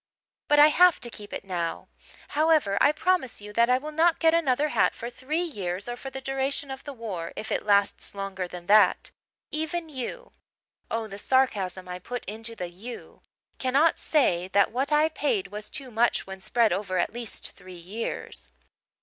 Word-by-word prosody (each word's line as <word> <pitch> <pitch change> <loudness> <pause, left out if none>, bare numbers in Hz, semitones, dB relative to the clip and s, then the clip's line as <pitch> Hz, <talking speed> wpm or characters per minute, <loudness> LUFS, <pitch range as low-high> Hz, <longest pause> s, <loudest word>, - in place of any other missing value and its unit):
"' - - -68
but 295 - +5
I 295 +1 +9
have 355 +2 +5
to 240 - -5
keep 205 -2 -10
it - - -5
now. 175 -3 -3 0.4
However, 305 -9 +3
I 290 - +6
promise 325 -4 0
you 210 0 -10
that 235 +2 +4
I 250 - +5
will 300 +4 -6
not 325 +2 +3
get 325 -1 +4
another 300 -3 +2
hat - - +2
for 235 +1 -6
three 295 +8 -2
years 195 - -4
or 240 - -3
for 270 +2 -7
the 265 - -6
duration 270 +1 -2
of 265 0 -7
the 290 - -5
war, 205 -10 -5
if 220 - -6
it - - -1
lasts 200 0 +2
longer 195 -2 -4
than 175 0 -9
that. 205 -2 +4 0.4
Even 320 +2 -2
you' 260 -5 -6 0.6
oh, 225 0 -1
the 200 -2 -8
sarcasm 195 -8 +1
I 180 0 -5
put 245 +6 -6
into 225 +3 -6
the 180 -4 -4
'you' 210 +8 -10 0.4
'cannot 275 +5 +3
say 185 - +2
that 200 +1 +3
what 265 +5 -1
I 300 +1 +5
paid 390 +5 -1
was 210 0 -7
too 275 -5 -7
much 235 +2 +2
when 190 0 -9
spread 230 -1 +2
over 190 -1 -2
at 175 - 0
least 235 -2 -5
three 185 -1 -13
years.' 190 +7 -6
240 Hz, 190 wpm, -27 LUFS, 195-290 Hz, 0.6 s, I